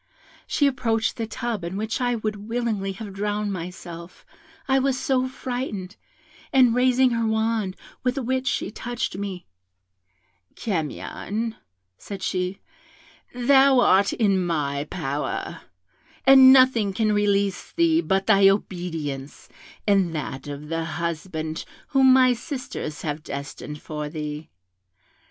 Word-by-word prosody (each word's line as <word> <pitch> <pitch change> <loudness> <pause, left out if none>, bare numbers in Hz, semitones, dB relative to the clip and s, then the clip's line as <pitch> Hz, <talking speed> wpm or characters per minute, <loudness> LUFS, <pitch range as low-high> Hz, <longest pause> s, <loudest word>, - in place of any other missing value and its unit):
She 290 - +2
approached 225 -5 +1
the 225 -1 -3
tub, 235 -5 -3
in 175 +3 -4
which 220 +4 -2
I 245 -1 +1
would 215 -1 -4
willingly 225 -5 -1
have 200 0 -8
drowned 205 +1 -2
myself, 170 -1 -8 0.4
I 270 -1 +3
was 265 -1 +1
so 260 -1 +1
frightened, 245 -7 -5 0.6
and 255 -3 +5
raising 255 +1 +4
her 230 -1 0
wand, 220 -3 0 0.3
with 250 +2 0
which 260 0 -1
she - - -1
touched 240 0 -4
me 195 -2 -5 1.1
'Camion,' 210 +4 -3 0.4
said 195 -2 -7
she, 185 +1 -2 0.7
'thou 265 +1 +5
art 200 -4 +4
in 195 -5 +2
my 145 -4 -1
power, 145 -4 -3 0.6
and 265 -1 +9
nothing 255 -6 +5
can 215 +1 +1
release 200 -2 +1
thee 335 -1 +3
but 195 - 0
thy 195 -2 +6
obedience 165 -8 -3 0.4
and 195 -5 +2
that 140 -2 -5
of 145 +1 -7
the 165 0 -1
husband 160 -1 -3 0.3
whom 265 -1 +5
my 255 -1 +6
sisters 245 - -6
have 150 0 -3
destined 145 +1 -7
for 150 -1 -5
thee. 150 0 -6
205 Hz, 125 wpm, -24 LUFS, 170-245 Hz, 1.1 s, and